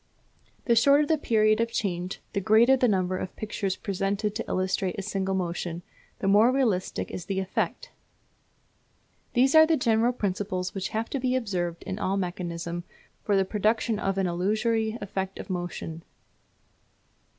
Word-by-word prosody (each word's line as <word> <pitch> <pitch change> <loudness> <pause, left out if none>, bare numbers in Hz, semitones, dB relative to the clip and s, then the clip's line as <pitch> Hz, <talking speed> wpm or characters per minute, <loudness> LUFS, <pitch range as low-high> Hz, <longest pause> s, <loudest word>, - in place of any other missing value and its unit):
The 235 - +4
shorter 280 +6 +5
the 320 - +2
period 215 -5 +3
of 230 0 -1
change, 180 -4 -2
and - - -25
the 200 - 0
greater 220 +6 +5
the 250 -1 +2
number 185 -3 +1
of 185 - -6
pictures 200 -3 -3
presented 200 +1 -2
to - - -3
illustrate 185 0 -1
a 195 - -3
single 195 -1 -1
motion, 175 -1 -3 0.3
the - - -3
more 210 +5 +6
realistic 230 -9 0
is 175 - -6
the 190 0 -2
effect. 190 - -2 1.4
These 265 +2 +4
are 315 0 +8
the 325 -1 +3
general 230 0 +2
principles 190 -4 -2
which 195 -1 -3
have 220 +1 -3
to 275 - -1
be 255 0 0
observed 180 -8 -2
in 190 +2 -5
all 195 +1 0
mechanism 175 -2 -4 0.4
for 205 - +1
the 195 - +3
production 215 +2 0
of 195 -1 -1
an 195 - +1
illusory 215 +5 0
effect 190 -1 -4
of - - -7
motion. 175 -2 -4
200 Hz, 160 wpm, -27 LUFS, 185-230 Hz, 1.4 s, are